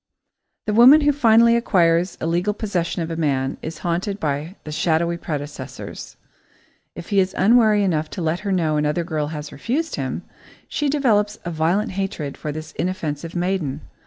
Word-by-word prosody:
The 210 - -1
woman 255 +7 +8
who 290 0 +4
finally 235 -4 +5
acquires 175 -6 +2
legal 175 +5 0
possession 180 -5 -2
of 165 - -5
a - - -2
man 135 -4 -1
is 160 - -6
haunted 185 +4 -1
by 155 +3 -3
the 155 - -7
shadowy 170 +2 +1
predecessors. 150 -3 -7 0.8
If 170 - -9
he 200 - +3
is 190 0 +1
unwary 215 0 +4
enough 160 -5 0
to - - -2
let 160 +2 0
her 200 -1 -3
know 160 -5 +1
another 150 +3 0
girl 155 -3 -2
has 150 -1 -6
refused 290 - -2
him, - - -3 0.4
she 295 -1 -1
develops 215 -7 +2
a 175 - -3
violent 165 +6 0
hatred 185 -7 -3
for 150 - -5
this 155 +1 -7
inoffensive 165 -2 -4
maiden. 175 -6 -1
175 Hz, 165 wpm, -22 LUFS, 155-210 Hz, 0.8 s, woman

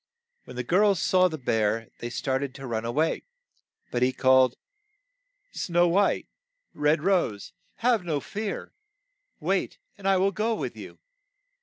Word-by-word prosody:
When - - -11
the 125 - -3
girls 195 +3 +3
saw 185 0 +4
the 160 -3 -5
bear, 115 -3 0
they 120 - -4
star 130 +2 -1
ted 140 -2 -5
to 135 - -8
run 115 -2 -3
a 115 - -1
way, 155 +6 +1 0.7
but 120 - -1
he 125 +1 +4
called, 130 -1 +4 1.0
"Snow 175 0 +1
White, 195 +4 +2 0.5
Red 150 +1 +1
Rose, 175 - 0 0.2
have 235 -4 +2
no 160 -4 -1
fear! 205 +7 -5 0.7
Wait, - - -1 0.2
and 195 - -4
I 195 -1 +4
will 195 +2 +2
go 220 +3 0
with - - -4
you." - - -10
155 Hz, 155 wpm, -26 LUFS, 125-195 Hz, 1.0 s, saw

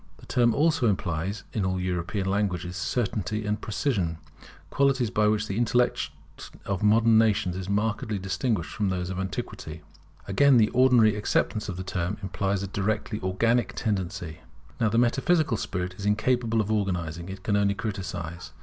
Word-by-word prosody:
The - - -15
term 120 -2 +2
also 150 -4 +3
implies 95 0 -1
in 105 - -1
all 95 0 0
European 90 +2 -2
languages, 95 -3 -1
certainty 105 - -2
and 105 +1 -1
precision, 100 - -1 0.5
qualities 135 -5 +2
by 105 0 +2
which 110 0 +1
the 100 -1 -4
intellect 120 +1 +1 0.6
of 100 -2 -2
modern 110 +1 +5
nations 105 -5 +2
is 95 0 -5
markedly 105 +1 0
distinguished 95 -2 -2
from 105 -2 -1
that 90 -1 -2
of 95 - -4
antiquity. 95 -1 -5 0.4
Again, 135 +6 +5
the 110 -2 +4
ordinary 120 -4 +5
acceptation 105 +1 0
of 90 - -7
the 95 - -4
term 90 +1 -2
implies 95 0 -1
a - - -3
directly 105 +2 -2
organic 115 +6 +1
tendency. 90 -6 -3 0.4
Now 110 - +3
the 115 - 0
metaphysical 135 +4 +2
spirit 90 -3 -3
is 100 - -5
incapable 115 +1 +2
of 105 0 -3
organizing; 90 -5 -2
it 95 0 -8
can 105 - +1
only 100 -1 +2
criticize. 90 -4 -5
100 Hz, 160 wpm, -26 LUFS, 95-115 Hz, 0.6 s, modern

